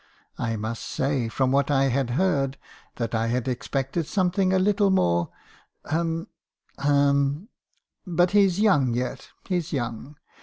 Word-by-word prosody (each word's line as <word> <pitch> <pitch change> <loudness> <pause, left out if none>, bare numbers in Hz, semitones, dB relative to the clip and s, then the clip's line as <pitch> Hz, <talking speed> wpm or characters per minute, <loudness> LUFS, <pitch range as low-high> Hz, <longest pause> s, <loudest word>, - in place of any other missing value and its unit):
I 115 -2 -1
must 110 +2 -4
say, 135 -3 -1
from 130 +2 0
what 140 +1 +2
I 135 -2 +3
had 130 -1 0
heard, 140 -8 +1 0.4
that 115 -1 -3
I 115 0 0
had 125 +2 -1
expected 135 +5 -2
something 185 -1 +1
a 190 - +3
little 200 +1 +3
more 85 - +2 0.3
— - - -37
hum 165 +1 -1 0.3
— - - -29
hum! 140 - +2 0.6
But 175 0 +2
he's 200 -2 +3
young 145 - +3
yet; 125 +2 -4 0.2
he's 175 -3 -2
young. 125 +1 -4
140 Hz, 150 wpm, -25 LUFS, 125-180 Hz, 0.6 s, I